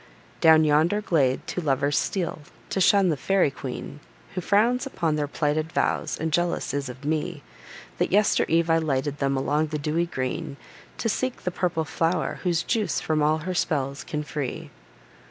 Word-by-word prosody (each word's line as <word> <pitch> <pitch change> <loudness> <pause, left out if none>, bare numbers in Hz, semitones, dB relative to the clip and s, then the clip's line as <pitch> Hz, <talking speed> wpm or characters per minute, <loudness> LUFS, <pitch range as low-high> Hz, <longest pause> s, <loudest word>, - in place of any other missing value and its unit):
Down 160 -1 +6
yonder 155 +7 +3
glade 145 -10 +1
two 180 - -3
lovers 140 -1 +1
steal, 180 -5 -1 0.3
to 190 - 0
shun 195 0 +5
the 160 - +2
fairy 185 +2 +2
queen, 135 +2 -7 0.3
Who 180 - -3
frowns 235 - +2
upon 165 - -1
their 150 -1 -1
plighted 155 +2 -1
vows, - - 0
and 160 -1 -2
jealous 175 -5 0
is 140 -2 -2
of 130 +3 -10
me, 155 0 -2 0.6
That - - +1
yester 205 +2 +3
eve 165 +1 +2
I 165 - +4
lighted 145 -2 -1
them, 135 -1 +1
along 150 +3 +1
the 155 0 -3
dewy 155 +4 0
green, 130 -2 -4 0.4
To - - -1
seek 255 +3 -2
the 180 - -1
purple 175 -3 -1
flow'r, 165 +3 -1
whose 175 -2 +1
juice 215 -8 0
from 155 -1 0
all 155 +1 +3
her 185 - -2
spells 140 -5 -1
can 150 -1 -4
free. 145 -3 -5
155 Hz, 175 wpm, -25 LUFS, 145-175 Hz, 0.6 s, Down